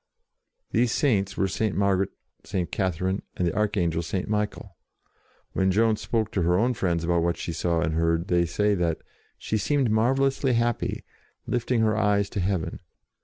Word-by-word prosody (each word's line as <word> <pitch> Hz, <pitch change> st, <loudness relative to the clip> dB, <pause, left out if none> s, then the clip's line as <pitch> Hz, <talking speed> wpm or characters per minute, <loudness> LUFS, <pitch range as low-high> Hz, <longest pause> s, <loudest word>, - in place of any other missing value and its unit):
These 120 Hz, -1 st, +2 dB
Saints 105 Hz, -, +1 dB
were 95 Hz, -, +2 dB
St. 105 Hz, +2 st, -1 dB
Margaret, 100 Hz, -1 st, +2 dB, 0.3 s
St. 90 Hz, -3 st, -3 dB
Catherine, 95 Hz, +1 st, -1 dB, 0.2 s
and 90 Hz, -, +1 dB
the 85 Hz, -, -2 dB
Archangel 95 Hz, -6 st, +1 dB
St. 90 Hz, +3 st, -3 dB
Michael. 105 Hz, 0 st, -3 dB, 0.8 s
When 95 Hz, 0 st, +2 dB
Joan 110 Hz, +3 st, +3 dB
spoke 110 Hz, 0 st, -2 dB
to 95 Hz, -, 0 dB
her 90 Hz, +1 st, +3 dB
own 120 Hz, +5 st, +2 dB
friends 85 Hz, -6 st, -1 dB
about 85 Hz, 0 st, +2 dB
what 85 Hz, 0 st, 0 dB
she 85 Hz, -, -4 dB
saw 85 Hz, 0 st, 0 dB
and 80 Hz, -2 st, 0 dB
heard, 85 Hz, +2 st, +1 dB
they 85 Hz, -2 st, +2 dB
say 105 Hz, +5 st, +1 dB
that 85 Hz, -4 st, 0 dB, 0.2 s
" -, -, -35 dB
she 110 Hz, -, -2 dB
seemed 135 Hz, +1 st, +1 dB
marvellously 135 Hz, +4 st, +2 dB
happy, 120 Hz, 0 st, 0 dB, 0.4 s
lifting 120 Hz, -1 st, 0 dB
her 110 Hz, -1 st, +2 dB
eyes 100 Hz, -2 st, +1 dB
to -, -, -3 dB
heaven." 95 Hz, -3 st, -1 dB
100 Hz, 170 wpm, -26 LUFS, 85-110 Hz, 0.8 s, Joan